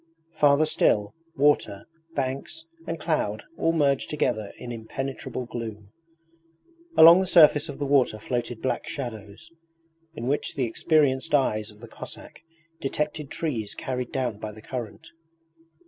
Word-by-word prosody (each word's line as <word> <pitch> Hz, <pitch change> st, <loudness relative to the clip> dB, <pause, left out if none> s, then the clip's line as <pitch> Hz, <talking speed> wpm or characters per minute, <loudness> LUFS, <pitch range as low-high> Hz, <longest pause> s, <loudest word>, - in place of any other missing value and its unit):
Farther 150 Hz, 0 st, +4 dB
still, 105 Hz, -8 st, +2 dB, 0.2 s
water, 140 Hz, -8 st, +2 dB, 0.3 s
banks, 135 Hz, -, -3 dB, 0.2 s
and -, -, -3 dB
cloud -, -, -1 dB
all 165 Hz, -, +1 dB
merged 140 Hz, -4 st, +1 dB
together 120 Hz, -8 st, -1 dB
in 120 Hz, -, -7 dB
impenetrable 130 Hz, +2 st, -5 dB
gloom. 110 Hz, -4 st, -7 dB, 1.1 s
Along 170 Hz, +3 st, +10 dB
the 190 Hz, -, 0 dB
surface 155 Hz, -3 st, +6 dB
of 140 Hz, -, -6 dB
the 145 Hz, -, -2 dB
water 135 Hz, -5 st, +3 dB
floated 120 Hz, +1 st, -4 dB
black 130 Hz, -, -1 dB
shadows, 110 Hz, -6 st, -7 dB, 0.6 s
in 115 Hz, -, -5 dB
which 140 Hz, +3 st, -1 dB
the 135 Hz, -4 st, 0 dB
experienced 145 Hz, +3 st, +2 dB
eyes 110 Hz, -6 st, +1 dB
of 105 Hz, 0 st, -16 dB
the 120 Hz, -, -10 dB
Cossack -, -, -10 dB, 0.4 s
detected 150 Hz, +1 st, -3 dB
trees 120 Hz, -11 st, -3 dB
carried 125 Hz, -2 st, -4 dB
down 125 Hz, -6 st, -2 dB
by 110 Hz, 0 st, -5 dB
the 110 Hz, +1 st, -13 dB
current. 125 Hz, +6 st, -7 dB
130 Hz, 135 wpm, -26 LUFS, 110-145 Hz, 1.1 s, Along